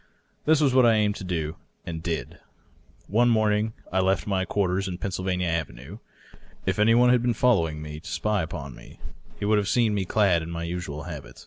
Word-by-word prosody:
This 155 0 +4
was 140 -4 +3
what 130 -1 +6
I 115 - +5
aimed 105 -1 +2
to - - -7
do, 80 -3 -3 0.3
and 80 -1 -5
did. 80 -2 -4 0.7
One 120 +4 +3
morning 110 -1 +2 0.2
T 95 - +2
left; 95 0 +1
my 95 -2 0
quarters 95 -1 0
in 90 -2 -4
Pennsylvania 95 -1 -2
Avenue. 80 - -4 0.7
If - - -1
any 115 +2 +5
one 125 +1 +5
had 125 -1 +4
been 120 -1 +1
following 85 -11 +2
me 75 0 -7
to 85 +2 -10
spy 100 +4 0
upon 70 -5 -6
me - - -15 0.4
he - - -2
would 105 0 +3
have 100 - -2
seen 115 -1 +2
me 100 -2 -1
clad 95 -3 +2
in 80 - -6
my 85 0 -4
usual 85 -3 -5
habit. 70 -7 -9
95 Hz, 205 wpm, -25 LUFS, 80-105 Hz, 0.7 s, what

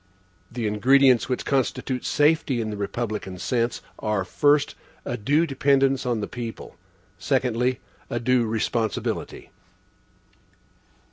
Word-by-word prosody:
The 120 -1 -3
ingredients 130 +4 +4
which 125 - -2
constitute 130 -1 -1
safety 150 -4 +2
in 110 -1 -2
the - - -4
republican 105 -2 -4
sense 120 +4 -1 0.2
are, 105 -3 -1
first, 145 +9 +2 0.3
a - - -2
due 145 +10 +2
dependence 135 -2 +2
on 120 -3 0
the - - -3
people, 120 -2 -7 0.4
secondly, 125 +1 0 0.3
a 120 - -2
due 120 0 +2
responsibility. 110 0 -2
125 Hz, 115 wpm, -24 LUFS, 110-135 Hz, 0.4 s, ingredients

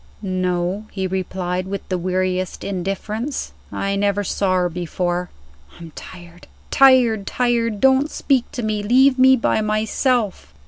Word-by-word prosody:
"No," 185 +1 -2
he 190 -2 -3
replied, 185 -1 -3
with 200 +1 -5
the 185 - 0
weariest 185 0 -2
indifference. 200 +7 -4 0.2
"I 195 0 -2
never 200 0 0
saw 190 0 0
her 180 -1 +2
before. 175 +1 -3 0.5
I'm 165 -2 -11
tired 175 -1 -12 0.2
tired 250 -6 +5
tired! 235 -3 0
Don't 265 +4 +3
speak 265 -6 0
to 245 - -4
me; 215 -1 -1
leave 255 +5 +4
me 260 +1 +7
by 230 - +1
myself." 215 - -1
200 Hz, 135 wpm, -20 LUFS, 185-230 Hz, 0.5 s, me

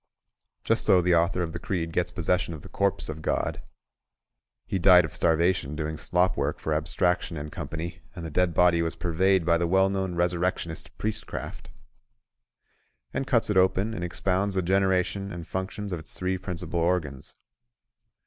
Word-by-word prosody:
Just - - +2
so 90 - +6
the 90 0 +2
author 85 +2 +2
of 80 -1 -5
this 85 - -6
creed 85 -4 -2
gets 90 +1 0
possession 90 -1 -1
of 75 - -11
the - - -11
corpse 100 -1 0
of 80 0 -6
God - - -1 1.0
(He 95 - -2
died 90 -1 +7
of 80 - -8
starvation 85 -2 +1
doing 75 0 -3
slop 90 +3 +1
work - - -1
for 80 - -2
Abstraction 85 +2 0
and 75 +1 -6
Company; 80 +3 -6
and 85 -3 -6
the 80 - -6
dead 90 +1 +1
body 85 -1 +4
was 80 0 -2
purveyed 90 +1 +2
by 85 -1 +3
the 85 - +1
well 95 +2 +3
known 95 -2 -2
resurrectionist 85 -1 -1
Priestcraft), 110 0 -5 1.4
and 135 - -2
cuts 115 -4 +2
it 100 - +1
open 95 +4 +3
and 85 - -4
expounds 95 +3 -1
the 95 - +1
generation 95 +1 +1
and 85 -2 -7
functions 95 +2 -4
of 85 - -3
its 80 - -10
three 95 0 -1
principal 90 -2 -4
organs. 80 -6 -1
90 Hz, 170 wpm, -26 LUFS, 85-95 Hz, 1.4 s, died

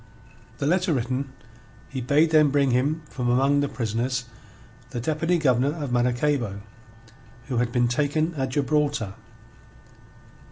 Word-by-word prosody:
The - - -2
letter 180 +3 +2
written, 130 +2 -2 0.6
he 130 - -5
bade 150 +6 +3
them 155 -2 +5
bring 140 -1 +2
him 145 +6 +1
from 125 -4 -3
among 135 +3 +3
the 145 -1 0
prisoners 120 +2 -2 0.6
the 130 -3 -4
Deputy 160 +7 0
Governor 135 -1 +2
of 145 -6 -4
Maracaybo, 120 -3 0 0.9
who 125 - -1
had 120 0 0
been 120 0 +2
taken 150 +6 0
at 135 -4 -2
Gibraltar. 145 -5 0
135 Hz, 130 wpm, -25 LUFS, 125-150 Hz, 0.9 s, them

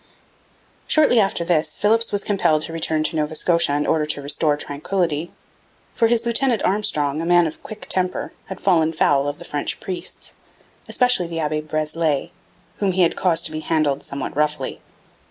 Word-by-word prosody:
Shortly 300 -6 +4
after 195 -4 +1
this 165 -3 +1
Philipps 225 +2 +2
was 200 -1 +1
compelled 160 -7 +1
to 165 - -6
return 160 -1 0
to 160 - -2
Nova 155 0 -1
Scotia 170 -2 +2
in 145 - 0
order 155 -2 +1
to 145 -1 -1
restore 145 +1 +1
tranquillity; 160 +2 -2 0.6
for 230 - +3
his 235 0 +1
lieutenant 235 -1 +1
Armstrong, 155 -7 0
a - - -3
man 175 -1 +5
of 160 - -5
quick 215 -1 -9
temper, 185 -1 -1
had 190 - -7
fallen 165 -4 +2
foul 140 -3 +2
of 145 0 -3
the - - -11
French 145 -1 -3
priests, 185 -2 -6 0.6
especially 245 -8 +2
the 165 -1 -4
Abbe 155 -1 -1
Breslay, 155 -1 -1 0.5
whom 195 -2 0
he 185 0 +3
had 170 - +2
caused 175 -3 +2
to - - -2
be 155 - -4
handled 155 -3 0
somewhat 140 -1 -6
roughly. 150 -2 -1
165 Hz, 175 wpm, -21 LUFS, 150-190 Hz, 0.6 s, man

